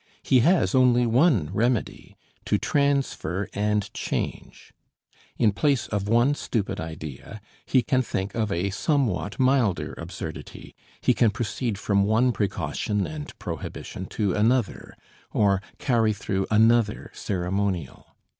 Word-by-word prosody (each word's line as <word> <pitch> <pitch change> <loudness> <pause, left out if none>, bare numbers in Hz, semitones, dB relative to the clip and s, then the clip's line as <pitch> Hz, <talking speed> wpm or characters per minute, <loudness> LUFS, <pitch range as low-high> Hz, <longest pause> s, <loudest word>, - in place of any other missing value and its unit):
He 130 - +4
has 170 +8 +3
only 125 -2 +4
one 115 - +3
remedy 115 +1 -1 0.3
to - - +2
transfer 140 - 0
and 105 0 -1
change. - - -5 0.6
In 110 -3 +4
place 135 +3 +1
of 100 -2 -2
one 120 +6 +3
stupid 105 -8 -2
idea 80 +4 -7 0.3
he 130 -2 +3
can 130 +1 +2
think 95 -5 -3
of 110 -3 -1
a 95 +3 -1
somewhat 105 - -1
milder 130 -7 +2
absurdity, - - -8 0.3
he - - +3
can 115 - +3
proceed 110 +1 -3
from 100 0 +1
one 110 +5 +3
precaution 105 -1 -1
and 155 -1 -7
prohibition 85 +3 -6
to 100 -4 -1
another, 115 +1 0 0.4
or 100 -2 +3 0.2
carry 115 -5 +2
through 95 -1 -2
another 110 0 +3
ceremonial. 95 - -3
110 Hz, 125 wpm, -25 LUFS, 100-125 Hz, 0.6 s, He